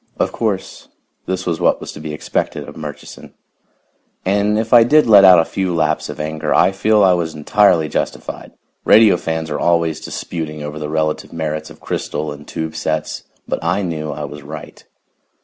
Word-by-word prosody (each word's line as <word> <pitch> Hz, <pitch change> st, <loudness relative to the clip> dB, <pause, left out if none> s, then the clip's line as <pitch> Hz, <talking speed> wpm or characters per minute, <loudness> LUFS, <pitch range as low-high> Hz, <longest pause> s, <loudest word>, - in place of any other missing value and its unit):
Of -, -, 0 dB
course, 105 Hz, -5 st, -3 dB, 0.4 s
this 95 Hz, 0 st, -2 dB
was 85 Hz, -2 st, -2 dB
what -, -, +3 dB
was -, -, -7 dB
to -, -, -10 dB
be 75 Hz, 0 st, -6 dB
expected 75 Hz, -, -3 dB
of -, -, -10 dB
Murchison. 75 Hz, -1 st, -9 dB, 0.9 s
And 100 Hz, +2 st, +2 dB
if 110 Hz, +1 st, -1 dB
I 120 Hz, -1 st, +9 dB
did 150 Hz, +6 st, +4 dB
let 105 Hz, -3 st, +7 dB
out 95 Hz, -2 st, +9 dB
a 80 Hz, -, +4 dB
few 95 Hz, -3 st, -2 dB
laps 80 Hz, -2 st, 0 dB
of -, -, -7 dB
anger, 75 Hz, 0 st, -3 dB
I -, -, +4 dB
feel 105 Hz, +2 st, +2 dB
I 95 Hz, -1 st, +5 dB
was 85 Hz, -3 st, -2 dB
entirely 85 Hz, +1 st, +3 dB
justified. -, -, -4 dB, 0.3 s
Radio 110 Hz, -3 st, +6 dB
fans 80 Hz, -2 st, -3 dB
are -, -, -2 dB
always 85 Hz, -2 st, +1 dB
disputing 75 Hz, -3 st, -5 dB
over 75 Hz, +1 st, -6 dB
the 75 Hz, -1 st, -4 dB
relative 80 Hz, 0 st, -2 dB
merits 80 Hz, -1 st, -4 dB
of -, -, -14 dB
crystal 75 Hz, +1 st, -3 dB
and 75 Hz, 0 st, -10 dB
tube 80 Hz, -1 st, -5 dB
sets, 80 Hz, -1 st, -3 dB, 0.2 s
but -, -, -3 dB
I 90 Hz, +4 st, 0 dB
knew 80 Hz, -3 st, -3 dB
I 75 Hz, +1 st, -5 dB
was 75 Hz, +1 st, -9 dB
right. 75 Hz, +1 st, -10 dB
80 Hz, 185 wpm, -18 LUFS, 75-95 Hz, 0.9 s, I